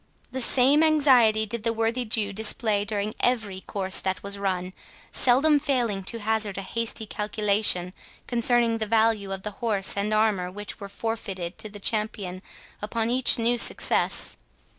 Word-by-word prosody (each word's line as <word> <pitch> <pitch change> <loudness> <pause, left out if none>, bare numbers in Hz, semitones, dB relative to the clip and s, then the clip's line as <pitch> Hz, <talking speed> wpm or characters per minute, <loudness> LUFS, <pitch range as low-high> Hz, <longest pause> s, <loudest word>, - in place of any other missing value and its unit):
The 260 - -3
same 265 +5 +4
anxiety 260 -9 +4
did 220 +2 -2
the 230 +1 0
worthy 230 +2 -1
Jew 215 -2 0
display 215 0 +1
during 205 0 -2
every 215 -6 -1
course 190 -1 -2
that 190 -1 -3
was 200 0 -3
run, 185 -2 -3 0.4
seldom 285 +4 +3
failing 245 -9 -1
to 230 +3 -4
hazard 215 -2 0
a 195 - -4
hasty 230 +1 -2
calculation 210 -4 +1 0.3
concerning 235 -1 +1
the 220 - -2
value 220 -2 +1
of 190 0 -5
the 210 - -5
horse 210 -5 +3
and 200 +1 -2
armour 215 -4 +1
which 205 +2 -7
was 200 -1 -9
forfeited 200 -5 -5
to 215 - -2
the 205 0 -10
champion 200 -3 -2 0.4
upon 225 +2 -2
each 255 0 +3
new 235 +1 +1
success. - - +2
215 Hz, 160 wpm, -25 LUFS, 200-235 Hz, 0.4 s, same